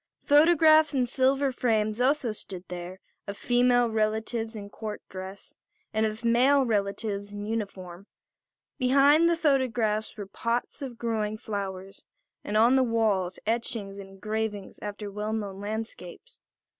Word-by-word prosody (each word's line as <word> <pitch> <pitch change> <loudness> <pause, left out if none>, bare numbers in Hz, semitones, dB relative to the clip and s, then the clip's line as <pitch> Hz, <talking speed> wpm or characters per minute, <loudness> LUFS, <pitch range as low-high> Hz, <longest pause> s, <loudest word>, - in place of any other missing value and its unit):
Photographs 310 0 +5
in 255 -2 +2
silver 265 +2 +2
frames 220 -2 0
also 260 -2 +2
stood 190 -3 -7
there, 180 +1 -7 0.3
of 200 0 -5
female 245 0 +3
relatives 220 +1 -1
in 205 -2 -7
court 215 +1 -6
dress 190 +1 -9 0.4
and 220 0 +2
of 215 +2 -6
male 260 +4 +4
relatives 205 -1 -2
in 205 0 -6
uniform. 200 -4 -5 0.7
Behind 280 +6 +5
the 340 - +1
photographs 245 -9 0
were 205 - -5
pots 230 +8 -3
of 255 -4 -6
growing 215 -2 -2
flowers; 195 -4 -6 0.4
and 210 - -1
on 235 +4 +5
the 260 - +4
walls 215 -6 0
etchings 215 -3 -2
and 195 -1 -9
engravings 210 0 -4
after 205 0 -6
well 210 +2 -3
known 200 -3 -4
landscapes. 220 - -7
220 Hz, 135 wpm, -27 LUFS, 205-245 Hz, 0.7 s, Photographs